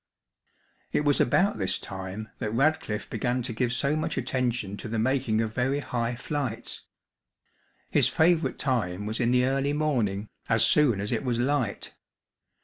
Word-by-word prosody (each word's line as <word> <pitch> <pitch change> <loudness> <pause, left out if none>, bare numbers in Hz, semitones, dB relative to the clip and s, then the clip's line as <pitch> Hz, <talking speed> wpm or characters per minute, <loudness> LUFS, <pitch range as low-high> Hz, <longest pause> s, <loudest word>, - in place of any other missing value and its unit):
It 150 - 0
was 145 -1 +3
about 195 - +2
this - - +1
time 95 +3 -6
that 110 - -2
Radcliffe 135 -6 +1
began 125 0 -1
to 120 -1 -3
give 120 +2 0
so 140 +4 +1
much 155 - -2
attention 120 -6 -1
to - - -7
the 115 +1 -3
making 115 -1 +1
of 110 -1 -2
very 130 +4 +1
high 120 -4 -2
flights. 130 -2 -4 1.1
His - - +4
favourite 165 0 +2
time 105 -8 -1
was 110 +2 -2
in 120 -2 +2
the 125 0 +3
early 135 +2 +1
morning, 115 -10 0 0.2
as 115 0 +4
soon 120 -3 +4
as 100 - -3
it 115 0 -1
was 125 -3 0
light. 125 -3 -1
125 Hz, 160 wpm, -27 LUFS, 110-140 Hz, 1.1 s, His